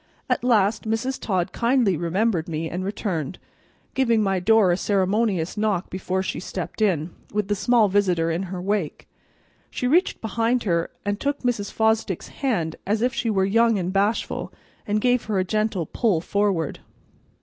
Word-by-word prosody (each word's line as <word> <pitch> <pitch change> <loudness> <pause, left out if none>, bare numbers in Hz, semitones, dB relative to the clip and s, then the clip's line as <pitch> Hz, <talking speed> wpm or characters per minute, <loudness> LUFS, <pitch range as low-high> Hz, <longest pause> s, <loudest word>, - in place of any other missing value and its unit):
At - - +1
last 220 -2 +2
Mrs. 250 +4 -1
Todd 185 -5 -1
kindly 235 -5 +2
remembered 175 +1 0
me 160 0 -2
and 180 +3 -4
returned, 185 - -3 0.6
giving 230 -5 +2
my 195 -2 +1
door 210 0 +4
a - - +3
ceremonious 195 -2 0
knock 210 -4 0
before 185 0 -2
she - - -3
stepped 185 +3 -6
in, 175 -6 +1 0.2
with 210 -1 -1
the 205 - +2
small 230 +1 +3
visitor 180 -4 +2
in 165 +3 -1
her 185 -1 -4
wake. 195 -4 -2 0.6
She - - -4
reached 335 +9 +2
behind 230 +2 0
her 170 -4 0 0.2
and 205 0 -1
took 285 0 -1
Mrs. 235 -5 -1
Fosdick's 220 -4 0
hand 175 - -2
as 215 +3 +1
if 250 +1 +1
she 235 -1 -1
were 195 -3 +2
young 230 +2 +3
and 185 0 -2
bashful, 200 +3 0 0.4
and 210 0 +1
gave 245 +1 +2
her 215 -2 -1
a 185 - +2
gentle 215 -2 -1
pull 210 -4 +1
forward. 195 -3 0
205 Hz, 170 wpm, -24 LUFS, 185-225 Hz, 0.6 s, door